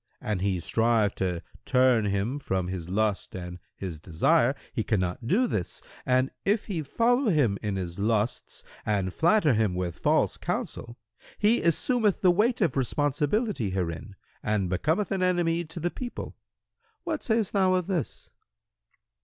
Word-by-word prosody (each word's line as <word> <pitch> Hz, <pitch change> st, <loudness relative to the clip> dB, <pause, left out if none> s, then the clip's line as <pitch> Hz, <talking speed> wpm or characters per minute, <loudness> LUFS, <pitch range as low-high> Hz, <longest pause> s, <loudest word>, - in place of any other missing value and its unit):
An 105 Hz, -3 st, -2 dB
he 95 Hz, -1 st, 0 dB
strive 110 Hz, +3 st, +2 dB
to 90 Hz, -3 st, -2 dB, 0.2 s
turn 125 Hz, -3 st, +3 dB
him 100 Hz, +7 st, -1 dB
from 95 Hz, -9 st, -2 dB
his 90 Hz, -2 st, -5 dB
lust 105 Hz, 0 st, -1 dB
and 90 Hz, -1 st, -7 dB, 0.2 s
his 90 Hz, -5 st, -6 dB
desire, 120 Hz, -, +2 dB, 0.2 s
he 115 Hz, -, -1 dB
cannot 95 Hz, +2 st, -1 dB
do 215 Hz, -, +3 dB
this, 95 Hz, -, -3 dB, 0.3 s
and 130 Hz, +1 st, +2 dB
if 205 Hz, +2 st, +1 dB
he 180 Hz, -6 st, -3 dB
follow 235 Hz, -, +2 dB
him 130 Hz, -, +2 dB
in 105 Hz, -2 st, -2 dB
his 90 Hz, -1 st, -4 dB
lusts 110 Hz, +2 st, -1 dB, 0.2 s
and 100 Hz, -3 st, -1 dB
flatter 170 Hz, -3 st, +3 dB
him 110 Hz, -4 st, +1 dB
with 90 Hz, -2 st, -3 dB
false -, -, +2 dB
counsel, 120 Hz, 0 st, -4 dB, 0.4 s
he 220 Hz, +3 st, +3 dB
assumeth 210 Hz, -, +2 dB
the 185 Hz, -, +6 dB
weight 225 Hz, +6 st, +2 dB
of 165 Hz, -9 st, +2 dB
responsibility 145 Hz, -, 0 dB
herein 90 Hz, +1 st, -4 dB, 0.3 s
and 100 Hz, -4 st, -1 dB
becometh 160 Hz, -, 0 dB
an 195 Hz, -1 st, 0 dB
enemy 175 Hz, -2 st, +1 dB
to 165 Hz, +2 st, -8 dB
the 175 Hz, +2 st, -1 dB
people. 245 Hz, -1 st, -6 dB, 0.7 s
What 325 Hz, -3 st, -2 dB
sayst 220 Hz, -3 st, 0 dB
thou 190 Hz, -2 st, +3 dB
of 180 Hz, -2 st, 0 dB
this?" 180 Hz, -5 st, -3 dB
125 Hz, 155 wpm, -27 LUFS, -, 0.7 s, the